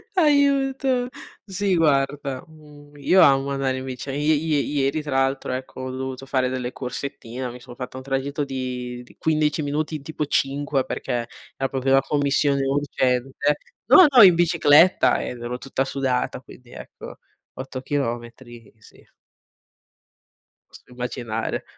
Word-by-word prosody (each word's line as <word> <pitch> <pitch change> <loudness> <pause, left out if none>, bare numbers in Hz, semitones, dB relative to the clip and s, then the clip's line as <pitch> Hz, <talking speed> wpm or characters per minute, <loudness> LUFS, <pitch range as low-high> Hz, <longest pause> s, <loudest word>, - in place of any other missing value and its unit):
Aiuto. 275 -5 +2 0.4
Sì 195 -1 -1
guarda, 140 -4 0
mhmm, 150 -2 -17
io 185 +6 +4
amo 135 0 +4
andare 135 -1 -1
in 130 - -6
bici, 130 +1 -6
ie 150 +3 +1
ie 155 0 0
ieri 140 +1 0
tra 150 - -6
l'altro, 135 -1 -1
ecco, 130 0 -6
ho 130 - -4
dovuto 130 0 -5
fare 130 -1 0
delle 125 -1 -3
corsettine, 125 -1 -6
mi 125 - -11
sono 120 0 -12
fatta 125 +1 -7
un 130 - -8
tragitto 140 +2 -2
di 125 -2 -5
di - - -20
15 155 -1 +1
minuti 150 +2 -2
in, 150 - -6
tipo 155 0 -3
5, 140 -1 0
perché 120 -2 -3 0.3
era 135 0 -2
proprio 135 0 -1
una 135 0 +6
commissione 140 -1 +1
urgente. 135 0 0 0.3
No, 370 - +8
no, 250 -4 +7
in 180 -3 +9
bicicletta 165 0 +4
ed 120 - -6
ero 120 +1 -4
tutta 135 0 -2
sudata 130 -2 -2
quindi, 125 -2 -16
ecco, - - -11 0.3
8 130 0 -7
chilometri, 120 -4 -5
sì. - - -20 1.6
Posso - - -15
immaginare. 125 -2 -4
135 Hz, 145 wpm, -23 LUFS, 130-150 Hz, 1.6 s, in